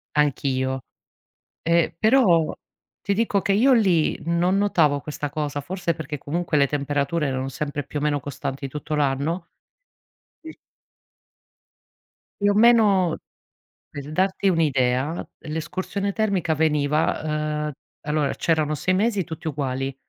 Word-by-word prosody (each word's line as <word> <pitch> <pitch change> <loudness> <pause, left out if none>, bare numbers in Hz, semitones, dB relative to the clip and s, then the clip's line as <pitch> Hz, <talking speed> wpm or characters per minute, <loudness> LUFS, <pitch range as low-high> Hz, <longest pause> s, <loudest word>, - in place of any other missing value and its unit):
Anch'io. 130 -3 0 0.8
Ehm, 170 0 +2
però 215 -9 +4 0.5
ti 200 - -1
dico 215 -2 +1
che 195 - 0
io 255 +7 +5
lì, 190 -10 +3
non 175 +3 +2
notavo 160 -8 +2
questa 145 0 -5
cosa, 145 -1 -3
forse 175 +2 -2
perché 150 -1 -6
comunque 165 +3 -2
le 140 - +4
temperature 145 +2 -1
erano 130 0 -2
sempre 145 +1 -4
più 145 - -5
o - - -5
meno 150 -1 +1
costanti 135 0 -5
tutto 150 +2 -5
l'anno? 150 +4 0 1.0
Sì. 320 0 -9 1.9
Più 205 0 +4
o - - +2
meno 210 -6 +4 0.7
per 145 +1 -8
darti 190 +4 +1
un'idea, 140 -2 +1 0.2
l'escursione 185 +6 -3
termica 195 -7 0
veniva 150 0 0
uhm, - - -5 0.3
allora 150 -1 0
c'erano 155 -2 0
6 170 +5 0
mesi 205 0 +1
tutti 160 +1 -7
uguali, 135 -2 -2
155 Hz, 125 wpm, -23 LUFS, 145-185 Hz, 1.9 s, io